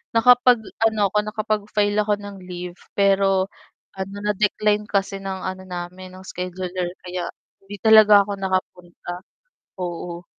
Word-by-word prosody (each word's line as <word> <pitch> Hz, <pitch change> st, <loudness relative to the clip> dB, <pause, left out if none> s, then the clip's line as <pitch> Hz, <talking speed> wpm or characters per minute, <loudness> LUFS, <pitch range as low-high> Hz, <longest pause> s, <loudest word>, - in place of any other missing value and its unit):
nakapag-ano 225 Hz, -3 st, +4 dB
ako, 210 Hz, -, 0 dB
nakapag-file 210 Hz, -1 st, 0 dB
ako 210 Hz, 0 st, +1 dB
ng 200 Hz, -1 st, -8 dB
leave, 180 Hz, 0 st, -7 dB, 0.2 s
pero 195 Hz, -1 st, +3 dB, 0.5 s
ano 190 Hz, +1 st, -5 dB
na-decline 210 Hz, 0 st, +1 dB
kasi 195 Hz, 0 st, 0 dB
ng 190 Hz, -1 st, -5 dB
ano 185 Hz, 0 st, -4 dB
namin 180 Hz, +1 st, -7 dB
ng 190 Hz, -, -13 dB
scheduler 180 Hz, 0 st, -4 dB, 0.2 s
kaya 180 Hz, -1 st, -4 dB, 0.3 s
hindi 205 Hz, +1 st, -9 dB
talaga 215 Hz, -2 st, +8 dB
ako 205 Hz, -, -5 dB
nakapunta, 180 Hz, -2 st, -3 dB, 0.7 s
oo. 175 Hz, 0 st, -5 dB
195 Hz, 120 wpm, -22 LUFS, 180-210 Hz, 0.7 s, talaga